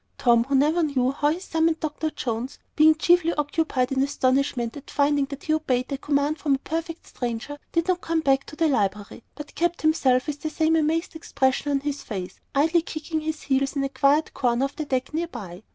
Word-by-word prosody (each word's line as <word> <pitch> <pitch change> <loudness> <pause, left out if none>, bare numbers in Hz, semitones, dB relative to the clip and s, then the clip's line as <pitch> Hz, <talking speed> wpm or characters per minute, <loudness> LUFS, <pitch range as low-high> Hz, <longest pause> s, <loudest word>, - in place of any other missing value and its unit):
Tom, 235 -1 +4
who 275 +1 0
never 305 +6 +3
knew 265 -5 +1
how 290 +1 +1
he 325 +4 -1
summoned 325 -3 0
Dr. 310 0 -2
Jones, 245 -1 -4 0.2
being 310 +1 +6
chiefly 335 +1 +3
occupied 290 -3 0
in 265 0 +1
astonishment 260 -3 0
at 285 - -10
finding 285 0 +2
that 280 0 -9
he 310 - 0
obeyed 260 -4 0
a - - -2
command 290 +2 0
from 285 -3 +2
a 270 - -10
perfect 330 +1 -4
stranger, 245 +4 -5
did 335 +1 0
not 365 -1 +1
come 325 -1 0
back 270 -2 +2
to - - -10
the 325 +1 +2
library, 205 -7 -1
but 295 -1 -9
kept 345 0 -1
himself 265 -5 +3
with 290 -1 -5
the 310 - -2
same 320 +1 +1
amazed 325 +2 0
expression 265 -3 0
on 280 -1 +2
his 285 0 -3
face, 185 -4 -6 0.2
idly 320 +4 +3
kicking 315 0 -4
his 310 0 -4
heels 270 +1 0
in 275 - 0
a 275 - -1
quiet 285 +3 +2
corner 245 +1 +1
of 275 - -6
the 310 - -4
deck 260 0 -2
near 335 +2 -1
by. 185 - -9
290 Hz, 215 wpm, -24 LUFS, 265-315 Hz, 0.2 s, being